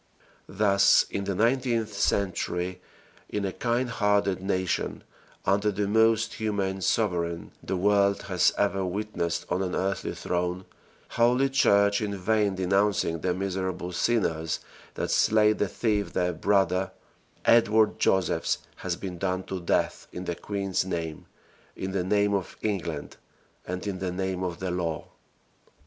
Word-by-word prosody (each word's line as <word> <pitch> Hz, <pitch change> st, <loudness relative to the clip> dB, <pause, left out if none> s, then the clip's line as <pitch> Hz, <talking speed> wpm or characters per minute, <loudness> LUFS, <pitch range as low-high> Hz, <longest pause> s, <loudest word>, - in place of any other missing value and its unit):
Thus 100 Hz, -2 st, +4 dB
in 100 Hz, -, -2 dB
the 100 Hz, -1 st, -2 dB
nineteenth 115 Hz, 0 st, +1 dB
century 90 Hz, -2 st, -1 dB, 0.5 s
in 105 Hz, -1 st, -2 dB
a 95 Hz, -, -1 dB
kind 120 Hz, +1 st, 0 dB
hearted 105 Hz, -4 st, +1 dB
nation 95 Hz, -1 st, -1 dB, 0.4 s
under 100 Hz, +2 st, +2 dB
the 100 Hz, +1 st, -1 dB
most 110 Hz, +1 st, +3 dB
humane 100 Hz, -3 st, -2 dB
sovereign 85 Hz, -5 st, 0 dB
the 95 Hz, -, -2 dB
world 100 Hz, +1 st, +3 dB
has 90 Hz, -3 st, +3 dB
ever 100 Hz, -1 st, +1 dB
witnessed 90 Hz, -3 st, -2 dB
on 90 Hz, -, -1 dB
an 90 Hz, -2 st, -2 dB
earthly 95 Hz, +1 st, -2 dB
throne 90 Hz, +1 st, -2 dB, 0.4 s
holy 125 Hz, +3 st, +3 dB
Church 100 Hz, -6 st, +3 dB
in 100 Hz, -2 st, -2 dB
vain 105 Hz, +1 st, +1 dB
denouncing 95 Hz, -2 st, +1 dB
the 90 Hz, -, 0 dB
miserable 95 Hz, -1 st, -3 dB
sinners 80 Hz, -6 st, 0 dB, 0.4 s
that -, -, -2 dB
slay 110 Hz, 0 st, +4 dB
the 105 Hz, -, -1 dB
thief 105 Hz, 0 st, -1 dB
their 90 Hz, 0 st, +1 dB
brother 95 Hz, +1 st, +1 dB, 0.6 s
Edward 110 Hz, -2 st, +4 dB
Josephs 95 Hz, -2 st, +2 dB, 0.2 s
has -, -, -3 dB
been 90 Hz, -3 st, -7 dB
done 95 Hz, 0 st, -1 dB
to 95 Hz, 0 st, -5 dB
death 85 Hz, -, 0 dB
in 90 Hz, -, -6 dB
the 85 Hz, -, -1 dB
queen's 100 Hz, +1 st, -2 dB
name 85 Hz, -4 st, -4 dB, 0.5 s
in 95 Hz, -, -4 dB
the 95 Hz, -1 st, -1 dB
name 100 Hz, +2 st, +2 dB
of 95 Hz, -3 st, -2 dB
England 85 Hz, -8 st, -3 dB, 0.5 s
and 90 Hz, +2 st, -4 dB
in 100 Hz, -3 st, -3 dB
the 95 Hz, -1 st, -2 dB
name 95 Hz, 0 st, -2 dB
of 90 Hz, -2 st, -3 dB
the 95 Hz, -1 st, -3 dB
law. 85 Hz, -3 st, -3 dB
95 Hz, 140 wpm, -27 LUFS, 90-105 Hz, 0.6 s, Thus